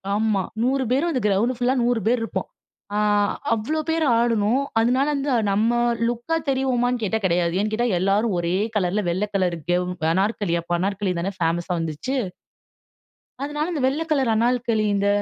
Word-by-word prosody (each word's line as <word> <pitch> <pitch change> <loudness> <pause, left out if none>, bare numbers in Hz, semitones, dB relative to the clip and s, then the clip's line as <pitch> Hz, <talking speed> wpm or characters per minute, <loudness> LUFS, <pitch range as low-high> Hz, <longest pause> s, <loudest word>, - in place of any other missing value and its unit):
ஆமா. 215 -2 +1 0.2
100 265 +2 +1
பேரும் 285 +7 +2
அந்த 255 -6 -1
கிரவுண்ட் 215 +6 +1
ஃபுல்லா 250 +1 +1
100 240 -1 +2
பேர் 245 +1 +3
இருப்போம். 225 - -3 0.5
அ - - +1 0.6
அவ்வளோ 235 +9 -1
பேர் 325 0 +1 0.2
ஆடுனோம். 230 +2 +2 0.2
அதனால 250 +4 +2
வந்து, 280 +1 -2 0.2
நாம்ம 220 +4 +2 0.3
லுக்கா 240 +7 -2
தெரிவோமான்னு 250 -2 +1
கேட்டா, 215 +2 0
கெடையாது. 170 -1 +1
ஏன்னு 215 +1 -1
கேட்டா, 240 +3 +1
எல்லாரும் 200 +2 +1
ஒரே 170 +1 -1 0.2
கலர்ல 195 +1 0
வெள்ள 185 +4 0
கலர்ல 180 -3 0
கெவ் 180 0 +1 0.3
அனார்கலி 195 -1 0
அப்ப 175 +1 -1
அனார்கலி 195 +1 -1
தானே 195 +3 -2
ஃபேமஸ்ஸா 170 +2 0
வந்துச்சு. 165 - -3 1.3
அதனால 295 +3 -2
இந்த 305 -6 -2
வெள்ள 275 +5 0
கலர் 265 -6 +2
அணால்கலி 230 -1 +1
இந்த 200 0 +1
225 Hz, 160 wpm, -23 LUFS, 195-255 Hz, 1.3 s, பேர்